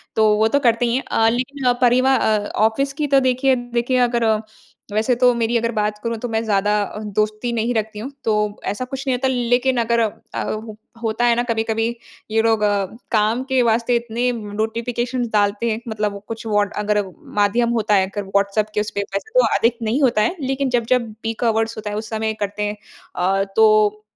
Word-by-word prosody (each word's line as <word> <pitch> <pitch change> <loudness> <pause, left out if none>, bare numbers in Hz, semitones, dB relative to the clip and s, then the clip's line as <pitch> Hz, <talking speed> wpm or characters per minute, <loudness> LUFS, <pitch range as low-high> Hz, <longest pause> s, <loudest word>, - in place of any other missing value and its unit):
तो 220 -1 +4
वो 220 - +3
तो 285 +6 +2
करते 240 -3 +2
ही 235 0 +1
हैं। 265 - -1
अ, 225 0 +4
लेकिन 255 +2 0
परिवा 255 +2 +4
अ, 215 -4 +1 0.2
ऑफिस 275 +5 -1
की 295 0 -2
तो 275 -1 +4
देखिए 260 0 +2
देखिए 245 +1 -1
अगर 240 -1 +2 0.7
वैसे 220 +4 +2
तो 250 -1 +6
मेरी 235 0 0
अगर 230 0 -1
बात 210 -2 -1
करूँ 230 -1 -2
तो - - -1
मैं 225 0 -1
ज़्यादा 205 -1 +1 0.4
दोस्ती 215 +3 0
नहीं 235 +1 0
रखती 220 -1 -2
हूँ। 255 +6 -6
तो 220 - +1 0.4
ऐसा 230 +5 -4
कुछ 270 +2 -6
नहीं 255 - +2
होता 265 - 0
लेकिन 250 0 +1
अगर 235 +1 +1
अ, 220 -2 -3 0.6
होता 225 +2 0
है 240 -1 +4
ना 240 - +1
कभी-कभी 225 -1 0 0.4
ये 225 0 +3
लोग 225 -1 +2 0.5
काम 225 +3 +2
के 260 -1 +3
वास्ते 235 +1 +2
इतने 235 +1 -1
नोटिफिकेशन 230 +3 -3
डालते 205 +2 +1
हैं, 220 - -2
मतलब 210 -2 -3
कुछ 225 0 -6
वोड 205 -1 +1
अगर 210 0 +1 0.4
माध्यम 235 +4 +2
होता 210 -1 +2
है, 190 -1 +3
अगर 205 +1 -4
व्हाट्सऐप 200 +2 0
के 210 - +1
उसपे। 210 -1 -3
वैसे 200 - -5
तो - - +5
अधिक 235 +1 +2
नहीं 230 +6 0
होता 240 -5 +3
है 220 - +1
लेकिन 270 0 -1
जब 245 -2 +1
जब 235 -3 -3
पीक 225 +1 -3
आवर्स 225 0 +1
होता 215 -1 -5
है 205 - -4
उस 220 0 -5
समय 220 0 -1
करते 205 0 -3
हैं। 210 0 -2 0.4
अ, 195 +2 +1
तो 215 -1 +4
225 Hz, 200 wpm, -20 LUFS, 215-245 Hz, 0.7 s, तो